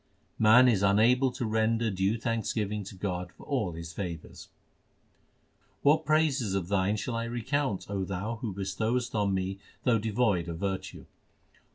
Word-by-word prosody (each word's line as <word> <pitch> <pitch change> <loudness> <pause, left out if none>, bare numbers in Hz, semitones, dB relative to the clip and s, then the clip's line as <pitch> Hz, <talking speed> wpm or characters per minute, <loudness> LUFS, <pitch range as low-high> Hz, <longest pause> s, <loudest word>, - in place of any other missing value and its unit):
Man 115 +4 +7
is 110 -6 +3
unable 115 +7 +4
to 120 - -3
render 110 +1 +1
due 95 +4 0
thanksgiving 110 -3 -2
to 95 - -9
God 90 -2 -3
for - - -15
all 115 - -1
His 85 0 -8
favours: 85 -4 -7 1.3
What 155 +2 +4
praises 145 -9 +2
of 95 -2 -2
Thine 100 +1 +1
shall 115 +3 -3
I 115 0 -2
recount, 120 -1 -2
O 100 -1 -2
Thou 100 +5 -3
who 110 -1 -4
bestowest 110 +6 -2
on 100 -2 +1
me 95 +1 -2 0.2
though 115 -3 +3
devoid 105 -5 +1
of 80 - -4
virtue 95 +1 -4
105 Hz, 155 wpm, -29 LUFS, 95-120 Hz, 1.3 s, Man